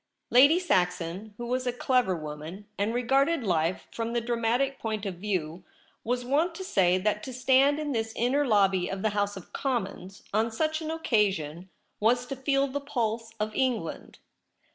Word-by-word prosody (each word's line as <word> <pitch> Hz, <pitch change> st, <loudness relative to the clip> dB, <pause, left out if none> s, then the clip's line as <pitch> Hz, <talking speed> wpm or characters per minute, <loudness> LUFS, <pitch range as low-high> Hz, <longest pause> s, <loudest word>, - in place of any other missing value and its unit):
Lady 280 Hz, +7 st, +7 dB
Saxon, 185 Hz, -, -1 dB
who 240 Hz, -, -5 dB
was 255 Hz, +1 st, -1 dB
a -, -, +2 dB
clever 245 Hz, -5 st, +1 dB
woman, 155 Hz, +5 st, -7 dB
and 205 Hz, +2 st, 0 dB
regarded 270 Hz, +5 st, +2 dB
life 170 Hz, -3 st, 0 dB
from 230 Hz, 0 st, -3 dB
the 240 Hz, -, +2 dB
dramatic 240 Hz, +3 st, 0 dB
point 215 Hz, -2 st, -3 dB
of 185 Hz, -3 st, -4 dB
view, 180 Hz, -4 st, -3 dB, 0.4 s
was 245 Hz, +1 st, -1 dB
wont 315 Hz, +7 st, +1 dB
to 380 Hz, -, -6 dB
say 185 Hz, -, +3 dB
that 210 Hz, +2 st, 0 dB
to 260 Hz, -, -7 dB
stand 265 Hz, +3 st, +3 dB
in 305 Hz, -1 st, -3 dB
this 225 Hz, -3 st, -1 dB
inner 255 Hz, +5 st, +2 dB
lobby 195 Hz, -7 st, +3 dB
of 195 Hz, 0 st, -4 dB
the 220 Hz, -, +3 dB
House 205 Hz, -1 st, -1 dB
of 190 Hz, -, -12 dB
Commons 200 Hz, -7 st, -3 dB
on 220 Hz, +2 st, +2 dB
such 315 Hz, +7 st, -1 dB
an 315 Hz, -, -4 dB
occasion 195 Hz, -, 0 dB, 0.3 s
was 245 Hz, +3 st, +2 dB
to 275 Hz, -, -5 dB
feel 275 Hz, +1 st, +1 dB
the 280 Hz, +1 st, -4 dB
pulse 225 Hz, -4 st, -2 dB
of 215 Hz, 0 st, -2 dB
England. 240 Hz, -9 st, -2 dB
225 Hz, 175 wpm, -28 LUFS, 195-265 Hz, 0.4 s, Lady